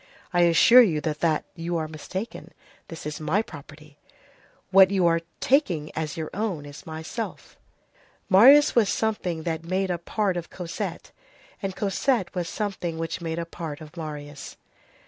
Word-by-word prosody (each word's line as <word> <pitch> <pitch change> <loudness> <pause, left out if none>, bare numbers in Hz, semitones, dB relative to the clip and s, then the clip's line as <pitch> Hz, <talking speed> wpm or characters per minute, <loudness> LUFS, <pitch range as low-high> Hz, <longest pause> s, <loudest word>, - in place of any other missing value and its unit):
"I 175 - +4
assure 235 +9 +8
you 170 -10 +2
that 155 0 0
you 170 0 -3
are 160 -1 -2
mistaken. 185 +7 -7 0.3
This 165 -2 -9
is 150 0 -4
my 170 +8 +1
property." 150 -3 -13 0.7
"What 190 -1 +8
you 190 -3 +2
are 165 0 +3 0.2
taking 180 - +1
as 155 -1 -3
your 160 -1 -4
own 190 -7 -3
is 145 +2 -11
myself."—Marius 215 - +1
was 225 -4 +3
something 185 -7 -1
that 165 -1 -3
made 185 +2 -1
a 175 - -2
part 190 +1 -1
of 170 - -5
Cosette, 175 -2 -6 0.5
and 195 -2 -3
Cosette 205 +2 0
was 175 -3 -3
something 190 -6 -3
which 165 +2 -4
made 165 -1 -3
a 170 - -2
part 160 -3 -7
of 155 0 -12
Marius. 150 -3 -7
170 Hz, 150 wpm, -25 LUFS, 155-195 Hz, 0.7 s, assure